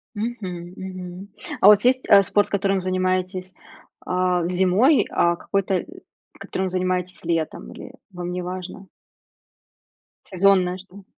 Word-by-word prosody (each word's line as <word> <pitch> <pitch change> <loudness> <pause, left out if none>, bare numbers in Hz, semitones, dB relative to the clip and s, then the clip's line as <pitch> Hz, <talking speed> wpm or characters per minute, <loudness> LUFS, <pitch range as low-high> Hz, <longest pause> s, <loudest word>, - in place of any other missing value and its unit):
Мгм, 190 -6 -5
мгм. 185 0 -8 0.3
А - - +7
у - - +11
вас 210 +2 +6
есть, 255 +1 +4
э, 200 -1 +8
спорт, 205 +2 +1
которым 195 -1 0
занимаетесь, 185 0 -1 0.5
а, 180 -1 0
зимой, 190 - +3
а 170 0 +2
какой-то, 190 +1 -1 0.5
которым 190 -1 -3
занимаетесь 185 0 -2
летом, 165 - -2
или - - -11 0.2
вам 175 0 -5
не 180 0 -3
важно? 185 +2 -7 1.4
Сезонное 185 -1 +2
что-то. 195 +1 -14
185 Hz, 125 wpm, -22 LUFS, 180-195 Hz, 1.4 s, у